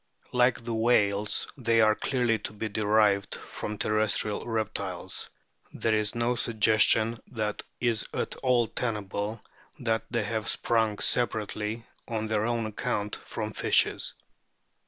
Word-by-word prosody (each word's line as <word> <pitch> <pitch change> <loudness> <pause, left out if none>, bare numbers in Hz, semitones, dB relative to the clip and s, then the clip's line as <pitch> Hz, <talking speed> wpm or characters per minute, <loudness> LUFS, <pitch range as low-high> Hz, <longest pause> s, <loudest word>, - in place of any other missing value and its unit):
Like 125 -1 +3
the 115 0 -3
whales, 105 -3 +2
they 115 -2 +2
are 110 -1 +5
clearly 120 -1 0
to 105 - -6
be 110 +1 -4
derived 105 -1 +2
from 105 0 -6
terrestrial 105 0 +1
reptiles; 105 -5 -3 0.4
there 115 - 0
is 105 0 0
no 120 +1 +1
suggestion 110 0 +2
that 110 -4 -3 0.2
is 120 -3 +1
at - - -2
all 125 -2 +3
tenable 105 -1 -3 0.4
that 115 -2 0
they 120 -2 0
have 110 0 -3
sprung 110 -3 +1
separately, 110 -1 0 0.2
on 110 -2 -2
their 110 0 0
own 120 -1 0
account, 105 -1 -2
from - - -5
fishes. - - +2
110 Hz, 130 wpm, -28 LUFS, 105-115 Hz, 0.4 s, are